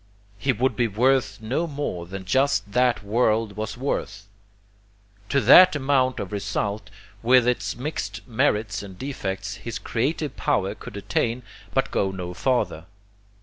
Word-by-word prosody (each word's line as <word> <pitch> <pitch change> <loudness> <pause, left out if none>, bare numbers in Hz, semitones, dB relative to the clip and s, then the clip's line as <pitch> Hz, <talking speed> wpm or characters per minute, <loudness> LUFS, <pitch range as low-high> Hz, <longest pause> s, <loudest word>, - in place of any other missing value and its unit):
He 135 - +2
would 130 +2 0
be 120 -2 +2
worth 115 -1 +2
no 130 +10 -1
more 140 - -4
than 95 +1 -7
just 115 -2 +1
that 125 -2 +2
world 110 -1 +1
was 105 0 -4
worth. 120 -6 -3 1.0
To 140 - +3
that 185 +3 +8
amount 135 -2 +1
of 100 - -5
result, 105 +1 -3 0.3
with 125 +1 +5
its 125 - 0
mixed 145 +3 -5
merits 110 -2 0
and 95 -2 -10
defects, 100 -6 -4
his 115 0 -5
creative 140 +7 -2
power - - 0
could - - -10
attain, 120 +2 -1 0.3
but - - +1
go 95 - +1
no 90 -2 -5
farther. 100 -8 -1
115 Hz, 145 wpm, -24 LUFS, 100-130 Hz, 1.0 s, that